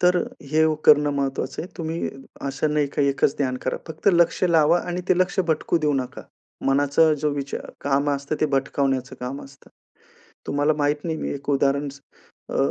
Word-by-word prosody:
तर 180 0 +4
अ, - - +2 0.3
हे 155 +1 +4
ओ 155 - +2
करणं 150 -1 +6
महत्वाचं 135 -1 -2
आहे. 175 - -8
तुम्ही 165 0 -3 0.4
असं 145 +3 -1
नाही 150 -1 +2
का, 140 +1 -1
एकच 140 0 +1
ध्यान 130 -3 0
करा - - -1
फक्त 160 +5 -1
लक्ष 170 +1 +3
लावा 170 -1 +4
आणि 180 0 -4
ते 185 - +3
लक्ष 185 +1 +2
भटकू 160 +1 +1
देऊ 150 -2 +1
नका. 130 -2 -3 0.4
मनाचा 145 +3 +4
जो 150 - +1
विचार 140 -1 -5
काम 140 +1 +1
असतं 140 +2 -2
ते 155 - +3
भटकावण्याचं 135 -1 -1
काम 130 +3 -5
असतं. 140 0 -17 0.8
तुम्हाला 145 +2 +2
माहित 145 0 0
नाही 160 -2 -2
मी - - -3
एक 140 +1 -5
उदाहरण 140 +1 +1
स 140 - -15 0.5
अ, - - -2
145 Hz, 190 wpm, -23 LUFS, 140-160 Hz, 0.8 s, करणं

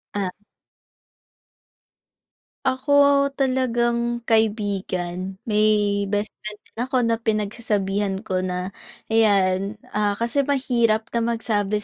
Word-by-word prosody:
Ah. 195 -2 0 2.4
Ako 280 +1 +4
talagang 240 -3 0
kaibigan, 195 -5 -1
may 210 -2 +2
bestfriend 210 +1 -4
din - - -30
ako 255 0 +1
na 230 -1 +1
pinagsasabihan 205 -3 -1
ko 185 -4 -1
na 185 0 -3 0.4
ayan, 200 -2 +3 0.2
ah, 205 -1 +1
kasi 235 +6 0
mahirap 235 -5 +2
na 235 - 0 0.2
magsabi 210 -2 -1
215 Hz, 90 wpm, -23 LUFS, 200-235 Hz, 2.4 s, Ako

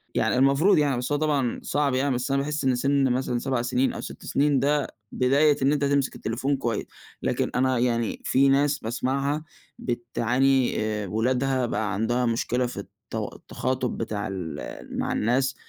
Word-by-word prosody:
يعني - - +2
المفروض 140 +9 +4
يعني 145 -4 +2
بس 125 +3 -3
هو 145 - +2
طبعًا 145 -5 0
صعب 145 -1 0
يعني، 135 0 +1
بس 125 +3 -2
أنا 140 - +2
باحس 150 +1 -2
إن 130 -1 +3
سِنّ 135 +1 +2
مثلًا 125 -1 0
7 130 -1 -1
سنين 125 +2 +1
أو - - -5
6 - - -9
سنين، 145 -1 +2
ده 145 +1 +1 0.2
بداية 140 +3 +3
إن 135 +2 +3
أنت 145 -1 +1
تمسك 140 -1 +1
التليفون 130 +5 -1
كويس. 120 -4 -2 0.4
لكن - - -1
أنا 130 0 +2
يعني 115 -2 0
في 135 +1 +4
ناس 140 +1 +3
باسمعها 135 +6 -1 0.4
بتعاني، 125 +2 +1
آآ 105 -1 -2
ولادها 125 +5 +1
بقى 110 -3 -1
عندها 120 +5 0
مشكلة 120 +2 0
في 120 - -6
التو - - -6
التخاطب 130 -1 -3
بتاع 105 -2 -3
ال 80 -9 -6
مع - - -1
الناس. 130 +4 +1
130 Hz, 170 wpm, -25 LUFS, 120-140 Hz, 0.4 s, المفروض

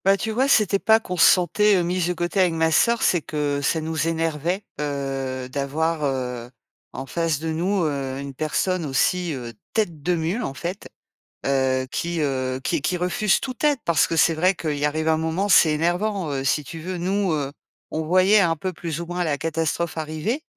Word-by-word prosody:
Bah, 195 0 +5
tu 220 - -3
vois, 255 +5 +1
c'était 210 -7 +3
pas 220 +2 +4
qu'on 180 -5 -5
se 170 - +4
sentait, 200 +4 +3
heu, 175 - +1
mises 175 0 0
de 180 - 0
côté 175 +3 -2
avec 180 -3 +3
ma 160 0 +1
sœur, 235 +7 +3
c'est 175 - +3
que 145 -2 -2
ça 160 +3 0
nous 160 0 -2
énervait, 165 +3 -1 0.2
heu, 135 -3 -3
d'avoir, 150 +4 -1
heu, 125 -3 -2 0.4
en 130 - -6
face 165 +1 -1
de 160 +1 -3
nous, 180 +4 0
heu, 135 -3 -2
une 140 0 -6
personne 165 +5 -1
aussi, 165 +5 +1
heu, 120 -3 -6 0.2
tête 175 -9 -1
de 180 +4 +1
mule, 170 +8 -1
en 135 - -4
fait, 180 +6 -6 0.6
heu, 130 -1 +1
qui, 170 0 -2
heu, 130 -2 -1
qui 165 +1 0
qui 165 +5 0
refuse 180 +3 +1
toute 255 0 -6
aide. 295 -2 +4
Parce 165 -5 +3
que 165 - -2
c'est 165 +1 +4
vrai 180 +4 +2
qu'il 150 -4 -3
arrive 155 +2 -1
un 160 0 +3
moment, 160 +5 -1
c'est 160 -4 +6
énervant, 175 +2 -1
heu, 135 -1 -2
si 140 +3 +1
tu 165 +3 -8
veux. 180 +3 -5
Nous, 190 +2 0
heu, 140 -3 -2 0.4
on 160 - -2
voyait 185 +6 +4
un 170 -4 +3
peu, 185 +4 -4
plus 165 -1 -5
ou - - -5
moins, 175 +1 -2
la 150 -4 -1
catastrophe 165 +1 -2
arriver 160 - -3
165 Hz, 205 wpm, -23 LUFS, 145-180 Hz, 0.6 s, c'est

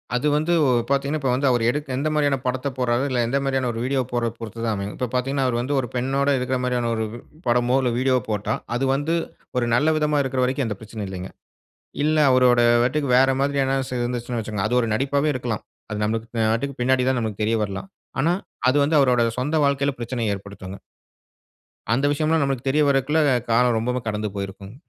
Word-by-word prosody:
அது 125 +5 +1
வந்து 155 +3 +1 0.4
பாத்தீங்கனா, 140 +2 0
இப்போ 135 -3 -1
வந்து 140 +2 +1
அவரு 120 -2 +2
எடுக்க 145 +3 -2
எந்த 145 +3 -1
மாதிரியான 145 -2 +2
படத்தை 130 +2 -1
போடுறாரு, 125 0 +1
இல்ல 125 -2 0
எந்த 135 +4 0
மாதிரியான 135 -2 0
ஒரு 115 - -5
வீடியோ 135 0 +1
போடுறதை 120 -2 -1
பொறுத்து 115 0 -8
தான் 110 - +1
அமையும். 100 +1 -4
இப்போ 125 - -2
பாத்தீங்கன்னா, 135 +2 0
அவர் 120 -2 0
வந்து 140 +4 -2
ஒரு 125 - -2
பெண்ணோடு 135 +3 +1
இருக்கிற 130 +1 -1
மாதிரியான 125 -2 0
ஒரு 110 0 -1
உ - - -8 0.3
படமோ, 120 +2 +3
இல்ல 125 -2 +1
வீடியோ 130 0 +3
போட்டா 105 -1 -1 0.2
அது 130 +3 0
வந்து, 150 +4 0 0.4
ஒரு 120 - +2
நல்ல 145 +6 +3
விதமா 150 -1 +1
இருக்கிற 130 -1 -1
வரைக்கும், 130 +1 0
எந்த 105 -3 -4
பிரச்சனையும் 110 -2 -6
இல்லிங்க. 95 0 -6 0.7
இல்ல 155 +1 +2
அவருடைய 125 -2 +5 0.2
நடிப்புக்கு 140 +3 0
வேற 135 +1 +5
மாதிரி 140 0 +1
இருந்ததுனு 130 -2 -1 0.2
வச்சுக்கோங்க, 105 -3 -3
அது 125 - +1
ஒரு 115 - -1
நடிப்பாவே 140 +5 +1
இருக்கலாம், 120 -4 -3 0.3
அது 105 - -3
நமக்கு 115 +4 -1
பின்னாடி 130 +1 +2
தான் 130 -2 0
நமக்கு 110 -2 -3
தெரியவரலாம். 105 - -2 0.3
ஆனா, 165 +5 +3 0.4
அது 130 - +3
வந்து 155 +2 +2
அவருடைய 125 -3 +3
சொந்த 150 +5 0
வாழ்க்கையில 140 0 +1
பிரச்சனையை 120 -2 -2
ஏற்படுத்துங்க. 100 -1 -9 1.2
அந்த 135 +4 +1
விஷயம்லாம் 155 +1 +1
நமக்கு 135 -2 -2
தெரிய 150 +3 +3
வருவதற்குள்ள 140 +3 +2 0.3
காலம் 120 +1 +3
ரொம்பவும் 125 +2 -2
கடந்து 105 0 -2
போயிருக்கும். 100 +1 -6
125 Hz, 190 wpm, -23 LUFS, 115-140 Hz, 1.2 s, அவருடைய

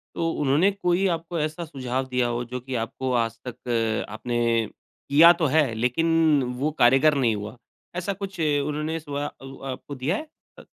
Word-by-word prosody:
तो 165 - 0
उन्होंने 150 +8 +3
कोई 190 -1 0
आपको 170 -1 -2
ऐसा 155 +3 -2
सुझाव 130 -4 -3
दिया 125 -1 +1
हो 120 0 -2
जो 125 +2 -5
कि 130 +1 -5
आपको 125 +3 -3
आज 115 -1 0
तक 115 -2 -1
आपने 110 +3 -4 0.7
किया 160 +5 +8
तो - - +4
है 145 -7 +3
लेकिन 155 +6 +2 0.2
वो 145 +4 0
कारगर 135 +5 +5
नहीं 120 -5 +2
हुआ, 105 +4 -7 0.4
ऐसा 180 +2 -2
कुछ 195 -1 -7
उन्होंने 150 +1 0
सुवा 145 -1 -4
उ 135 0 -11
आपको 135 +2 -6
दिया 135 +7 -1
है? 310 - -5 0.3
अ - - -12
140 Hz, 175 wpm, -25 LUFS, 125-165 Hz, 0.7 s, किया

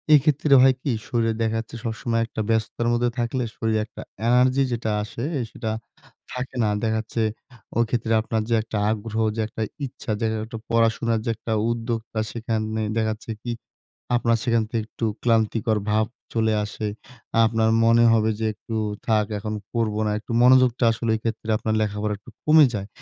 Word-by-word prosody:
এক্ষেত্রে 145 0 +3
হয় 130 0 +6
কি? 140 - -1 0.2
শরীরে 115 -2 +1
দেখা 110 0 +1
যাচ্ছে 115 - -8
সবসময় 115 0 -1
একটা 115 - -4
ব্যস্ততার 115 +1 0
মধ্যে 120 0 +2
থাকলে 120 +2 0
শরীরে 110 -1 0
একটা 110 - -11 0.3
এনার্জি 125 +2 +4
যেটা 115 -2 -2
আসে, 115 +2 -6 0.2
আ - - 0
সেটা 110 -2 -4 0.6
থাকে 125 +1 -5
না। 105 - +2
দেখা 110 0 +1
যাচ্ছে 115 +1 -3 0.6
ওইক্ষেত্রে 115 -1 +1
আপনার 110 0 -1
যে, 115 - +2
একটা 110 -1 -5
আগ্রহ, 110 0 -4 0.2
যে, 115 - -1
একটা 110 - -7 0.2
ইচ্ছা 125 -3 -6
যে, 115 - 0 0.2
একটা 115 0 -7
পড়াশোনার 115 0 +2
যে, - - -1
একটা 110 +1 -6 0.2
উদ্যোক্তা 115 -1 -3
সেখানে 110 -2 -2
দেখা 110 -1 +1
যাচ্ছে 110 +1 -8
কি? 120 - -4 0.7
আপনার 115 -1 +2
সেখান 115 -2 +2
থেকে 115 -2 -1
একটু 115 - -5 0.2
ক্লান্তিকর 110 -1 +2
ভাব 110 0 +2 0.3
চলে 110 -1 +2
আসে। 105 +1 -5 0.6
আপনার 110 0 +2
মনে 115 +1 +5
হবে 110 -1 +3
যে, 110 - +1
"একটু 110 +2 -6 0.3
থাক। 110 -2 +3
এখন 105 +1 -4 0.2
করবো 110 -2 0
না।" - - +1
একটু 110 - -8
মনোযোগটা 125 -1 +5
আসলে 115 +1 -2
এইক্ষেত্রে 110 0 -4
আপনার 110 0 -1
লেখাপড়া 105 0 -1
একটু 115 - -15
কমে 155 0 +7
যায়। 100 -1 -4
115 Hz, 170 wpm, -24 LUFS, 110-120 Hz, 0.7 s, কমে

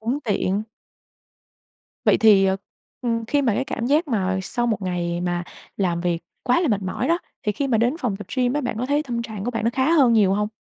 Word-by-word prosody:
Cũng 240 +6 -1
tiện. 205 -2 0 1.4
Vậy - - +4
thì, 210 -3 +6
ờ, 190 0 +2 0.4
ừm, 230 -2 -1
khi 285 +2 +1
mà 230 -6 +2
cái 265 - 0
cảm 235 - -3
giác 300 +5 +2
mà 190 -6 0
sau 240 +5 -1
1 215 -4 -1
ngày 175 -1 -2
mà 175 0 -1 0.3
làm 175 -4 0
việc 175 -1 0 0.2
quá 250 +6 +2
là 340 - +1
mệt 205 -3 +1
mỏi 205 +8 -2
đó, 340 +1 +3 0.2
thì 210 - 0
khi 280 +5 -2
mà 225 -3 +2
đến 245 +7 +2
phòng 215 -6 -1
tập 210 - -9
gym 250 -1 +2
á, 295 - 0
bạn 245 -5 -3
có 250 - -1
thấy 290 +2 +1
tâm 240 -5 -3
trạng 215 -4 -6
của 245 - -1
bạn 225 -3 -3
nó 230 - +3
khá 265 +5 +1
hơn 270 -8 +5
nhiều 200 -4 +4
hông? 210 0 0
225 Hz, 245 wpm, -23 LUFS, 195-255 Hz, 1.4 s, thì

